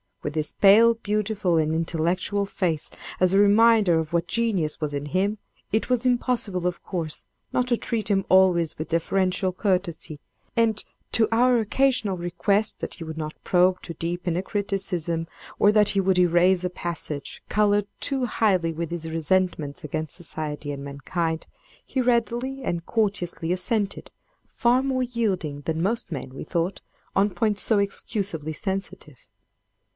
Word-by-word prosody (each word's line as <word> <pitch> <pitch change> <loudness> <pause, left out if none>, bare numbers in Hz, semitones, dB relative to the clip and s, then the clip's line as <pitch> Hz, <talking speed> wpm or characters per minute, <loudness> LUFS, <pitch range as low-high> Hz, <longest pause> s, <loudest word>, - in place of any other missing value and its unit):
With 150 - -3
his 155 -1 -1
pale, 225 +4 +6
beautiful, 210 -5 0
and 155 0 +1
intellectual 170 +5 0
face, 175 -6 -2 0.3
as 185 0 +3
a 195 - +5
reminder 205 -3 +5
of 160 0 -4
what 170 -1 +1
genius 200 -10 0
was 150 -1 -2
in 145 +1 -3
him, 200 +6 0 0.3
it 220 +4 0
was 250 0 +1
impossible, 240 -7 0
of 180 - -3
course, 165 -5 -3 0.3
not 250 0 +1
to 240 -2 +2
treat 225 -3 -2
him 195 -2 +2
always 180 -3 +4
with 155 +1 -5
deferential 185 +3 +1
courtesy, 180 -5 -1 0.4
and, 225 -2 +2 0.3
to 225 - +3
our 245 +1 +4
occasional 225 -3 +1
request 200 +5 0
that - - -4
he 170 - -8
would 160 -1 -7
not 155 -1 -4
probe 180 0 +3
too 170 - -7
deep 175 +3 -4
in 170 -1 +1
a 185 - -1
criticism, 185 -5 -2 0.3
or 205 - +6
that 210 -1 +4
he 200 - +1
would 190 -1 +2
erase 180 +1 +4
a 180 - 0
passage 165 -5 -4
colored 205 -1 +2
too 270 -2 0
highly 190 -8 +1
with 165 0 -4
his 165 -1 -4
resentments 165 -2 0
against 155 +1 -4
society 150 -4 -3
and 140 -1 -6
mankind, 160 +4 -3 0.4
he 260 - -2
readily 245 +2 0
and 170 -6 -2
courteously 195 -6 -1
assented—far 230 - -1
more 260 -1 0
yielding 195 - -2
than 160 +2 -2
most 205 0 -1
men, 135 -4 -5
we - - -6
thought, 170 +3 -2 0.3
on 200 +2 +4
points 205 +2 0
so 220 - +3
excusably 195 -5 -2
sensitive. 190 - -5
185 Hz, 155 wpm, -25 LUFS, 165-215 Hz, 0.4 s, pale